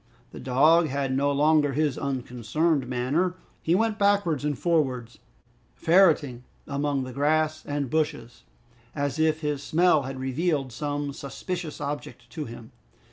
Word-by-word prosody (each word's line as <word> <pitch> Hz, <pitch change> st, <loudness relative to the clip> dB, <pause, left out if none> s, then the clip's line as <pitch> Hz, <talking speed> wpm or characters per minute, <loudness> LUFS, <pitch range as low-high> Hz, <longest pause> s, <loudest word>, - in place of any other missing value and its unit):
The -, -, -9 dB
dog 155 Hz, +6 st, +4 dB
had 135 Hz, -1 st, -1 dB
no 140 Hz, +1 st, +2 dB
longer 145 Hz, 0 st, +3 dB
his 150 Hz, -1 st, +1 dB
unconcerned 135 Hz, +3 st, -1 dB
manner; 140 Hz, +9 st, 0 dB, 0.3 s
he 165 Hz, -, +2 dB
went 220 Hz, +1 st, 0 dB
backwards 200 Hz, -8 st, +2 dB
and 145 Hz, -2 st, -1 dB
forwards, 130 Hz, -9 st, -1 dB, 0.6 s
ferreting 155 Hz, -, +3 dB, 0.2 s
among 140 Hz, -1 st, -1 dB
the 130 Hz, -1 st, -7 dB
grass 155 Hz, +2 st, +1 dB
and 145 Hz, -1 st, -2 dB
bushes 150 Hz, -5 st, -2 dB, 0.5 s
as 145 Hz, 0 st, -2 dB
if 160 Hz, 0 st, +2 dB
his 150 Hz, -2 st, -2 dB
smell 170 Hz, -2 st, +3 dB
had 135 Hz, 0 st, -6 dB
revealed 135 Hz, +1 st, -1 dB
some 145 Hz, +2 st, -3 dB
suspicious 160 Hz, +4 st, -6 dB
object 140 Hz, -4 st, -6 dB
to 155 Hz, -3 st, -5 dB
him. 115 Hz, -1 st, -10 dB
145 Hz, 135 wpm, -26 LUFS, 130-160 Hz, 0.6 s, dog